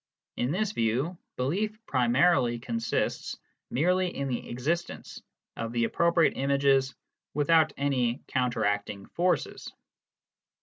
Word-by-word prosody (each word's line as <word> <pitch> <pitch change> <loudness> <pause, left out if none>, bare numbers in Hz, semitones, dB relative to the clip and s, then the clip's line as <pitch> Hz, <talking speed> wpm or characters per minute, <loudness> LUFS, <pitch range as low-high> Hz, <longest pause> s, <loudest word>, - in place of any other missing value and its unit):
In 120 - -1
this 200 +6 0
view, 130 - 0 0.2
belief 200 +12 -1
primarily 125 - +3
consists 115 -1 -2 0.3
merely 180 +6 +2
in 140 -6 -3
the 120 - -4
existence 155 +8 -3 0.3
of 115 0 -4
the 120 -1 +1
appropriate 170 +6 +3
images 135 -1 +2 0.4
without 155 +1 +4
any 130 -3 0
counteracting 105 -6 -1
forces. 180 +1 -1
135 Hz, 100 wpm, -28 LUFS, 120-170 Hz, 0.4 s, without